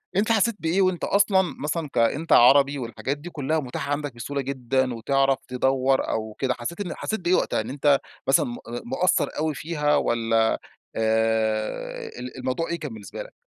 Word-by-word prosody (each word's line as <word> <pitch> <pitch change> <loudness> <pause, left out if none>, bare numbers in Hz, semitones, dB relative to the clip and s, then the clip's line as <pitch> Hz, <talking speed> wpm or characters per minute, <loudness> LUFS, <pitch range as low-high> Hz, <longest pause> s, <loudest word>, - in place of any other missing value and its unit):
أنت 215 +3 +2
حسيت 225 0 +3
بإيه 170 +4 +1
وأنت 185 -2 +1
أصلًا 200 -1 +4 0.2
مثلًا 155 +1 -2
كأنت 140 +8 +1
عربي، 140 +3 +6
والحاجات 125 +4 -3
دي 155 +5 -9
كلّها 155 0 -1
متاحة 140 +1 -4
عندك 145 -3 -2
بسهولة 140 +4 -3
جدًا، 130 -1 -1
وتعرف 135 +3 +1
تدوّر 130 +1 +1
أو 110 -1 -3
كده، 130 -2 +1
حسيت 170 +11 -5
إن 180 - -4
حسيت 220 - -3
بإيه 180 0 +2
وقتها؟ - - +1
إن 110 - -7
أنت 140 +1 +3 0.3
مثلًا 135 - +4
م 120 -1 -5 0.3
مقصّر 155 +9 +1
أوي 155 0 0
فيها، 150 -1 0
والَّا 115 -3 +1 0.4
آآ، 110 -1 0
ال 125 +1 -7
الموضوع 130 +6 -2
إيه 170 0 -2
كان 145 -7 -6
بالنسبة 105 -3 -8
لك؟ - - -15
135 Hz, 175 wpm, -24 LUFS, 120-160 Hz, 0.4 s, عربي